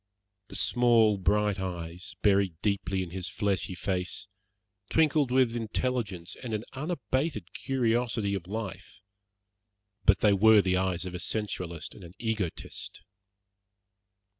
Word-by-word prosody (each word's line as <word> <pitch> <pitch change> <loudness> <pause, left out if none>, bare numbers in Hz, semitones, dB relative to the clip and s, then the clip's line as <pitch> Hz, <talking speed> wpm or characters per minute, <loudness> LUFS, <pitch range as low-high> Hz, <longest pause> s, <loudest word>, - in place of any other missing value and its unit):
The - - -10
small 115 -4 +4
bright 105 +1 +2
eyes, 90 -1 -5
buried 100 -5 +3
deeply 95 -2 0
in 85 - -8
his 95 0 -3
fleshy 95 -2 -1
face, 90 +4 -2 0.6
twinkled 150 -4 +3
with 125 -2 +3
intelligence 110 -5 -2
and 115 -4 -3
an 105 - -3
unabated 135 - -2
curiosity 120 -5 0
of 90 -3 -4
life, 105 -1 -6 1.0
but 100 -2 +5
they 105 -2 +5
were 105 +1 +6
the 95 0 +2
eyes 95 -1 0
of 90 - -5
a 90 - -4
sensualist 90 -6 -2
and 100 - -13
an 85 +2 -12
egotist. 110 -7 -3
100 Hz, 125 wpm, -29 LUFS, 95-115 Hz, 1.0 s, were